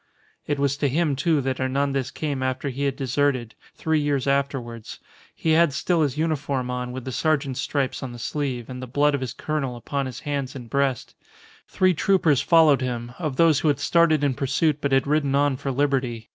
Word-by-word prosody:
It 145 - 0
was 140 0 0
to 145 -1 +1
him, 150 +1 +1
too, 150 +2 +1
that 130 -1 -2
Hernandez 135 0 0
came 145 -4 -3
after 130 +2 -2
he 135 +2 -3
had 135 -1 0
deserted, 130 -3 0 0.2
three 160 -1 0
years 145 -3 0
afterwards. 135 -5 -2 0.4
He 160 - 0
had 160 -2 +4
still 170 +4 +1
his 145 -2 0
uniform 140 -5 -1
on 125 0 -3
with 130 0 -7
the 130 - -4
sergeant's 140 -2 0
stripes 140 -3 -2
on 130 -3 -5
the 120 - -9
sleeve, 125 -1 -3
and 125 -1 -7
the 130 - -6
blood 145 +4 +2
of 140 - -1
his 125 -3 -4
colonel 140 -5 -3
upon 135 +3 -3
his 125 -2 -8
hands 140 -3 -3
and 120 -4 -9
breast. 140 -3 0 0.5
Three 185 -1 +2
troopers 165 -5 +2
followed 160 -5 +5
him, 120 -2 -3
of 155 -6 -2
those 160 -1 +4
who 155 - 0
had 145 -2 +2
started 160 0 +3
in 140 -2 +2
pursuit 140 +3 0
but 140 - -1
had 135 0 +3
ridden 140 -1 +1
on 140 -1 +2
for 135 - -5
liberty. 130 -4 -1
140 Hz, 205 wpm, -24 LUFS, 130-150 Hz, 0.5 s, followed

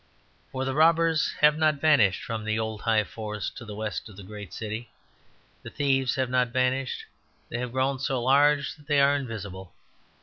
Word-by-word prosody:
For 130 0 -3
the 135 - -1
robbers 165 +1 +3
have 150 +1 +5
not 155 -1 +3
vanished 140 - +3
from 115 -2 -4
the 110 0 -1
old 110 -1 -3
high 110 -1 +2
forests 105 0 -5
to 120 - -10
the 105 -1 -8
west 110 +1 -4
of 100 - -14
the 100 - -9
great 105 -1 -9
city. 110 +1 -5 0.7
The - - -9
thieves 135 -2 +1
have 130 -2 -1
not 125 -1 +2
vanished; 130 +1 -1 0.4
they 120 - -3
have 125 -1 -4
grown 130 +1 0
so 135 -1 -1
large 140 +2 +3
that 145 -1 -20
they 145 -2 +3
are 140 +1 +5
invisible. 100 -8 -6
130 Hz, 190 wpm, -26 LUFS, 110-140 Hz, 0.7 s, have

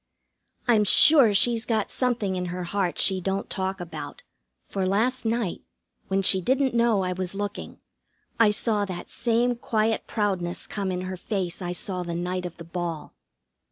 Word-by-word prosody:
I'm 225 -3 +4
sure 265 +3 +7
she's 225 +3 +3
got 220 -3 -1
something 230 -7 -1
in 180 0 -2
her 180 +1 -4
heart 180 0 -2
she 190 -2 +3
don't 195 +2 -3
talk 190 0 -3
about, 160 -4 -8 0.4
for 190 -2 -2
last 235 +6 0
night, 225 -4 -1 0.5
when 195 0 0
she 190 0 +5
didn't 260 +5 +1
know 235 -4 +2
I 180 0 -1
was 185 +1 -3
looking, 205 0 -5 0.6
I 225 -2 +6
saw 210 0 +1
that 185 -3 -7
same 240 +1 +1
quiet 220 -1 -1
proudness 190 -5 -2
come 195 -2 -3
in 180 0 -3
her 185 0 -5
face 185 -2 -4
I 175 -1 -3
saw 180 0 -3
the 170 -1 -4
night 180 +1 -3
of 175 - -13
the 170 - -9
ball. 170 -2 -5
195 Hz, 170 wpm, -25 LUFS, 180-225 Hz, 0.6 s, sure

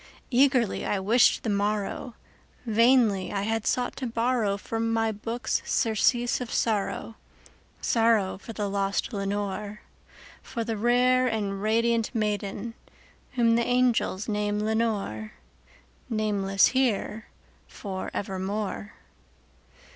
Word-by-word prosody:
Eagerly 255 -3 +3
I 205 - 0
wished 220 +6 +4
the 225 - -1
morrow;—vainly 215 +1 0
I 200 -1 -1
had 225 +1 -1
sought 250 -1 0
to 260 - -3
borrowFrom 230 -2 -1
my 225 0 +1
books 225 +2 -2
surcease 240 +3 +1
of 245 - -5
sorrow—sorrow 225 -1 -1
for 225 - -9
the 210 -2 -3
lost 200 +4 -1
Lenore, 205 +1 -3 0.6
For 235 -3 -4
the 225 0 -2
rare 250 +3 +3
and 205 -4 -2
radiant 230 +2 +1
maiden 210 0 -2 0.6
whom 235 -2 +3
the 235 +1 +3
angels 245 -5 +1
name 210 -1 -1
Lenore:Nameless 205 - -2
here 225 -4 0 0.4
for 190 -3 -6
evermore. 200 +2 -4
220 Hz, 100 wpm, -27 LUFS, 200-235 Hz, 0.6 s, wished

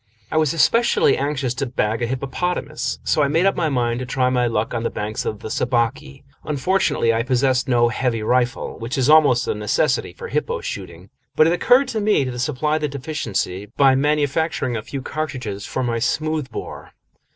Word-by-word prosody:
I - - 0
was 155 -3 +3
especially 230 +8 +3
anxious 140 -3 -1
to 135 +2 -3
bag 115 -1 -1
a 120 - 0
hippopotamus, 140 +5 -3
so 155 - +1
I 145 - +3
made 165 +6 +2
up 195 - +3
my 165 -3 0
mind 120 -3 0
to 130 - -4
try 130 0 +1
my 125 -1 +2
luck 115 -1 -1
on 115 - -1
the 115 - -1
banks 105 +1 -4
of 105 0 -4
the 110 - -6
Sabaki. 125 +4 -1 0.2
Unfortunately, 150 -5 +1
I 115 - +1
possessed 130 +1 +1
no 120 -1 +3
heavy 115 -1 -1
rifle, 125 +2 0
which 115 +3 -4
is 135 +2 +3
almost 140 -6 +5
a - - +1
necessity 105 0 0
for 475 -1 -8
hippo 475 0 -1
shooting, - - -7 0.2
but 155 - +5
it 165 - +3
occurred 250 +9 +4
to 220 - -2
me 205 -9 +2
to 125 -1 -5
supply 150 +4 0
the 150 - -1
deficiency 125 - -3
by 135 -2 +6
manufacturing 145 -1 0
a 110 - -2
few 135 +4 -6
cartridges 125 -11 -4
for 130 - -2
my 115 -1 -1
smoothbore. 155 +2 -3
130 Hz, 190 wpm, -21 LUFS, 120-155 Hz, 0.2 s, by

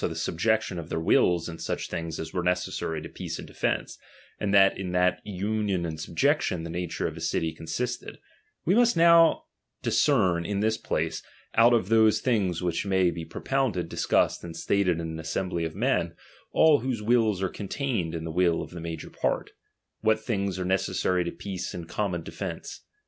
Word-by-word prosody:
the 80 - -6
subjection 90 +4 0
of 85 -1 -8
their 80 - -1
wills 85 0 +3
iu 80 -1 -7
such - - -3
things 85 -1 -4
as 80 0 -6
were 90 - 0
necessary 90 -2 -1
to - - -6
peace - - -6
and - - -8
defence; - - -2 0.4
and 100 - -1
that 100 -1 +6
in 90 -2 -4
that 90 0 +2
union 100 -2 -1
and 80 -2 -5
subjection 115 - +1
the 85 - -5
nature 90 0 -3
of - - -3
a - - -8
city 80 -1 -1
consisted; 80 +11 -4 0.5
we 180 - +3
must 240 0 +4 0.9
discern 95 - +3
now 85 - -6
iu 100 -1 -1
this 110 +1 +1
place, - - -2 0.3
out 115 +2 +6
of 110 -5 +2
those 110 -1 +5
things 95 -9 0
which 85 -2 0
may 95 -3 +2
be 85 - -6
propounded, 95 +1 -1
discussed, - - +1
and 85 -1 -7
stated 90 -4 +1
in 85 - -3
an 80 - -6
assembly 85 +1 -2
of 80 - -5
men, - - 0 0.4
all 155 -2 +5
whose 120 -3 -3
wills 110 -3 +3
are - - +2
contained 105 - -3
iu 80 - -3
the 80 0 -5
will 85 0 +2
of - - -11
the 85 -1 -7
major 80 0 -6
part, - - -1 0.5
what 110 0 +2
things 100 -4 -2
are 90 - -2
necessary 95 -1 +1
to 85 - -3
peace 95 -3 -5
and 85 -2 -6
common 90 -2 -2
de - - -8
fence. - - -6
90 Hz, 190 wpm, -27 LUFS, 85-110 Hz, 0.9 s, that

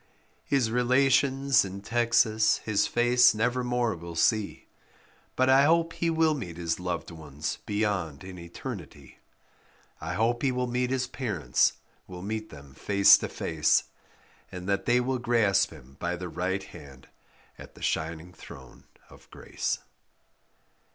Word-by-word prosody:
His 130 -5 +1
relations 135 +2 +3
in 100 0 -7
Texas 115 -1 +2
his 105 -2 +1
face 125 0 +4
never 125 +3 0
more 125 -2 0
will 85 0 -9
see, 105 +4 0 0.7
But 130 - +2
I 135 +1 +5
hope 165 +1 +2
he 170 - -1
will 160 -1 +2
meet 90 - -6
his 85 -1 -2
loved 90 0 -4
ones 75 -2 -6
beyond 100 -8 -2
in 95 -1 -9
eternity. 85 - -9 0.8
I 85 +3 -5
hope 115 +3 0
he 135 - +1
will 125 0 -1
meet 125 0 -1
his 130 -1 0
parents, 115 - 0 0.3
will 90 -1 -9
meet 110 +1 -4
them 70 -2 -13
face 100 +7 +5
to - - -4
face, 80 -2 +1 0.7
And 90 0 -8
that 100 0 -1
they 120 +1 +4
will 130 +1 -1
grasp 115 -5 +2
him 65 +2 -15
by 85 +1 -2
the 90 0 -6
right 95 +3 -2
hand 70 -3 -13 0.5
at - - -13
the - - -12
shining 80 +2 -3
throne - - -14 0.3
of - - -18
grace. - - -4
110 Hz, 145 wpm, -27 LUFS, 90-125 Hz, 0.8 s, I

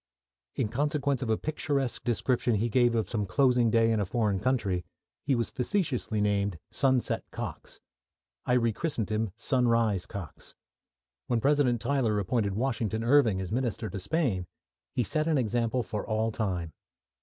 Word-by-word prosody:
In - - 0
consequence 140 +1 0
of 125 - -2
a 110 - +2
picturesque 140 -4 -2
description 120 0 +1
he 115 +3 0
gave 120 0 +3
of 110 -4 0
some 105 -3 -2
closing 125 +3 +3
day 115 0 +3
in 110 - +1
a - - +2
foreign 105 -2 0
country, 100 -6 0 0.4
he 140 -2 +1
was 115 -3 -1
facetiously 130 - -1
nicknamed 100 -3 +1
"Sunset 130 -3 +1
Cox." - - -7 0.6
I 125 - 0
rechristened 115 - 0
him 110 0 0
"Sunrise 115 -7 +1
Cox." 95 -8 -8 0.7
When 120 - +1
President 135 -2 +2
Tyler 125 -7 +1
appointed 100 0 0
Washington 115 -2 -1
Irving 115 -6 +4
as 95 0 -4
Minister 120 -5 -2
to 100 - -4
Spain, 100 - -1 0.5
he 125 - +2
set 155 +8 -1
an 160 -2 +2
example 120 0 0
for 105 -1 -4
all 110 +1 0
time. 90 -7 -2
115 Hz, 155 wpm, -29 LUFS, 105-130 Hz, 0.7 s, Irving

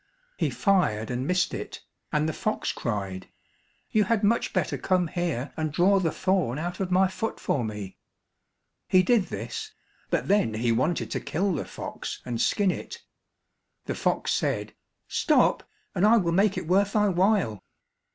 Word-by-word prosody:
He - - 0
fired 125 - +1
and 125 +2 -2
missed 180 0 +1
it, - - -6 0.3
and 150 +1 +1
the 160 - -1
fox 215 - -1
cried, 100 -5 -4 0.6
"You 215 -1 +3
had 225 0 +1
much 225 +3 +2
better - - 0
come 185 -2 +1
here 155 -6 -2
and 155 -1 -2
draw 190 +5 +4
the 165 -4 0
thorn 185 -10 0
out 175 +3 -4
of 190 -2 -1
my 185 +1 +4
foot 225 +4 -4
for 130 - 0
me." 105 -3 -6 0.9
He 185 0 +5
did 220 -1 +3
this; 435 0 -6 0.4
but - - 0
then 195 - +2
he 115 +2 +1
wanted 140 +9 0
to - - -1
kill 190 +4 -1
the 150 - -3
fox - - -6
and 120 -2 -2
skin 200 -3 +2
it, - - -7 0.8
the - - -2
fox - - 0
said, - - -1 0.3
"Stop, - - +2 0.2
and 190 - 0
I 220 +3 +6
will 175 -6 +1
make 195 +3 +3
it - - -3
worth 200 +3 +2
thy 210 -1 +3
while." 180 - +1
180 Hz, 170 wpm, -26 LUFS, 130-200 Hz, 0.9 s, I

